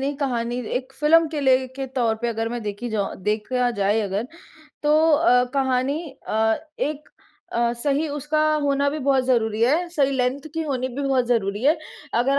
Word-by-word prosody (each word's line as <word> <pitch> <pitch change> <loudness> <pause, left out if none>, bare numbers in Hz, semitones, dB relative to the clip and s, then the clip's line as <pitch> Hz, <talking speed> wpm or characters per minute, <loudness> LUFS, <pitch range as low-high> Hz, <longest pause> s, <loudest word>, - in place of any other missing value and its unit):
नहीं, 280 +2 -1
कहानी 245 -4 -2 0.2
एक 260 +1 -5
फ़िल्म 320 +2 +5
के 300 -2 -3
लिए 260 -1 +3
के 270 - -3
तौर 245 -4 0
पे 235 +2 -2
अगर 225 0 -2
मैं 240 0 -4
देखी 210 +3 -4
जाऊँ 205 -2 -2
देखा 235 +4 0
जाए 205 0 +1
अगर, 205 +3 -2 0.6
तो 300 +1 +4 0.2
अ, 270 -5 +4
कहानी 265 +2 +1 0.3
अ, 220 0 +2 0.2
एक 300 +1 -3 0.4
अ, 235 0 +1
सही 290 +2 +1
उसका 295 +1 -1 0.2
होना 280 0 +2
भी 305 - -3
बहुत 270 -2 +2
ज़रूरी 225 -4 +1
है, 320 +8 +2
सही 280 -5 +1
लेंथ 265 +3 -1
की 325 - -1
होनी 260 -4 -2
भी 270 +3 -5
बहुत 255 -3 +2
ज़रूरी 210 -3 0
है। 305 +4 +4 0.4
अगर 275 +3 +2
260 Hz, 185 wpm, -23 LUFS, 235-285 Hz, 0.6 s, फ़िल्म